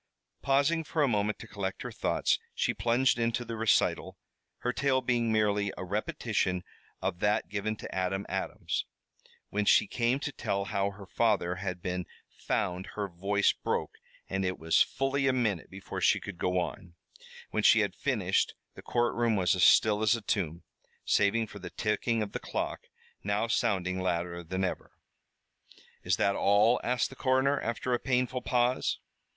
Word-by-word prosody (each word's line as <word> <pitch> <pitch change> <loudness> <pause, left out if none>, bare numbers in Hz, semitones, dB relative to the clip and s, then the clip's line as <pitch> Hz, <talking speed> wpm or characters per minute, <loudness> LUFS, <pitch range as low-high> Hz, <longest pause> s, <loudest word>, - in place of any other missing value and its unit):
Pausing 140 +4 +2
for 155 0 0
a - - +4
moment 105 -3 0
to - - -10
collect 95 -2 -4
her - - -5
thoughts, - - +1 0.2
she - - +1
plunged 120 +1 +2
into 115 +1 0
the 115 - -5
recital, 115 -1 +1 0.4
her 125 - -1
tale 135 -1 +2
being 120 -2 0
merely 105 -2 +2
a - - -4
repetition 100 -1 -1 0.4
of 95 -2 -1
that 105 -4 +1
given 105 +2 -2
to - - -8
Adam 95 +1 -1
Adams. - - -2 0.6
When 105 +1 0
she 100 - +5
came 120 +4 0
to 145 - -2
tell 100 -7 -2
how 100 0 0
her 100 0 -11
father 95 -4 +1
had 90 -2 -4
been 90 0 -3 0.3
found 90 +1 -2
her 105 -1 -2
voice 100 +3 +1
broke - - -3 0.3
and 95 0 -2
it 90 0 -1
was 80 0 +3
fully 135 0 +1
a 130 - +3
minute 110 -8 -1
before 95 0 -7
she - - +4
could 100 -4 -8
go 90 0 0
on. 85 0 -5 0.6
When - - 0
she - - +6
had - - -1
finished - - 0 0.2
the - - -11
courtroom 120 -1 +1
was 90 -4 +3
as - - -1
still 105 -1 +5
as 110 +1 +4
a 115 - -5
tomb, 90 -6 -2 0.4
save 110 +2 +2
for 100 - -10
the 90 - -7
ticking 110 +1 0
of 100 - -6
the - - -4
clock, - - -4 0.4
now 105 +2 0
sounding 95 -6 0
louder 85 -1 -2
than 95 +3 -3
ever. 95 - -3 1.1
"Is - - +1
that 100 0 +2
all?" 105 +4 +4
asked 125 +1 0
the - - -10
coroner, 130 +2 +2
after 120 +2 -2
a 120 - +1
painful 125 -1 0
pause. 120 +2 +1
105 Hz, 170 wpm, -30 LUFS, 95-120 Hz, 1.1 s, she